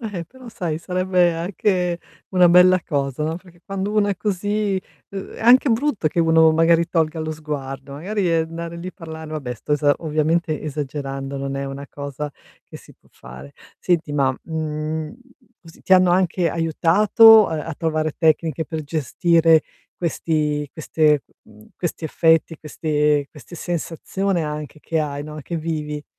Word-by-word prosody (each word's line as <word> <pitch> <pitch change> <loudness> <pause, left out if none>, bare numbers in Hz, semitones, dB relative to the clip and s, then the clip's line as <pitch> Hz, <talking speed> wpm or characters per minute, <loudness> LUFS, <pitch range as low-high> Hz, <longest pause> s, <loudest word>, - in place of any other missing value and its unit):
Eh-eh, 205 -7 -5
però 255 +5 -14
sai, 175 -9 -3
sarebbe 180 0 +1
anche 180 0 -1 0.3
una 180 -2 +5
bella 180 +1 +6
cosa, 140 -2 -2
no, 160 +2 -1
perché 175 -1 -16
quando 195 +1 -3
uno 210 -1 +2
è 200 - -1
così, 205 0 -1 0.3
uhm, 195 -1 -7
è - - -10
anche 250 +5 +6
brutto 230 - +1
che 160 - -5
uno 160 -1 +5
magari 165 +1 +3
tolga 160 -1 0
lo 155 0 -3
sguardo, 140 -3 -6
magari, 185 +5 -2
ehm, 165 -1 +1
andare 170 0 -6
lì 175 +2 -6
e - - -9
parlare 160 -3 -9
vabbè, 140 -6 -4
sto 135 - -5
esa 145 0 +3
ovviamente 155 0 0
esagerando, 140 -2 -5
non 135 0 -4
è 140 0 -3
una 135 +1 -7
cosa 140 +1 -6 0.4
che - - -11
si - - -16
può - - -29
fare. 65 +3 -12 0.3
Senti, 165 -4 0
ma, 135 -3 +1
mhmm, 155 +1 -4 0.5
così 165 -1 -16
ti 190 - 0
hanno 185 -1 +6
anche 180 -1 +2
aiutato 205 +7 +5
a - - -4
a 165 - -5
trovare 155 -1 -1
tecniche 160 -1 +1
per 160 -1 -5
gestire 165 +2 +3 0.3
questi 150 -3 -1
queste 155 -2 +1 0.2
m - - -20
mhmm, 105 0 -17
questi 175 -1 -4
effetti, 165 0 +2
queste 150 -1 0
queste 160 +3 -13
sensazione 175 +2 -2
anche 150 0 -6
che 165 +1 -2
hai, 145 -2 -2
no, 155 +1 -8
che 170 +4 -5
vivi? 150 -2 -4
160 Hz, 165 wpm, -21 LUFS, 150-180 Hz, 0.5 s, bella